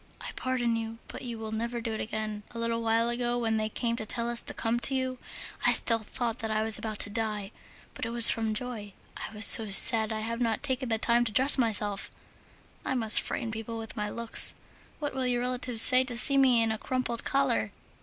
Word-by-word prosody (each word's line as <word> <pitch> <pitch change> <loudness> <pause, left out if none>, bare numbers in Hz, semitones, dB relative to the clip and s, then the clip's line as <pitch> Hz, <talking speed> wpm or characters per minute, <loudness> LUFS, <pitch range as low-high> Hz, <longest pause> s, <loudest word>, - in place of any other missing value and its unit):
I - - -9
pardon 245 -3 -3
you, 225 0 -8
but - - -10
you 240 -3 -8
will 220 -1 -9
never 235 +2 -5
do 225 -1 -6
it 220 - -6
again. 215 -1 -7
A 235 - -13
little 230 0 -4
while 230 +1 -1
ago, 240 0 -3
when 225 -2 -3
they 215 0 -4
came 235 +1 -4
to 220 - -7
tell 235 +1 -4
us 235 - -1
to - - -6
come 230 +1 -4
to 265 +2 +2
you, 260 -1 -5 0.4
I - - +2
still 230 -1 +1
thought 235 +1 -6
that 225 - -6
I 215 0 -2
was 220 -1 +7
about 215 -1 -7
to 205 - -2
die, 210 -2 -5 0.4
but - - -7
it - - -7
was 235 -1 +7
from 220 -1 0
joy. 215 -4 -6 0.2
I - - -9
was 210 0 +3
so 220 -2 +4
sad! 220 +2 +6
I 220 0 -5
have 230 +2 -6
not 230 +1 -3
taken 260 -3 -3
the 225 - -1
time 235 +2 0
to 225 - -4
dress 265 +6 +6
myself, 210 -5 -3 0.7
I - - -4
must 225 -3 +3
frighten 225 - -6
people 225 +1 -8
with 225 -1 -9
my 210 0 -5
looks! 235 0 +4 0.4
What 290 -1 -6
will 260 -1 -4
your 245 -1 -2
relatives 250 -2 +6
say 255 0 +8
to 245 -2 -5
see 275 +3 +5
me 255 -4 +2
in 225 - -2
a 220 - -6
crumpled 255 -2 -5
collar? 265 -6 -2
230 Hz, 235 wpm, -26 LUFS, 220-245 Hz, 0.7 s, say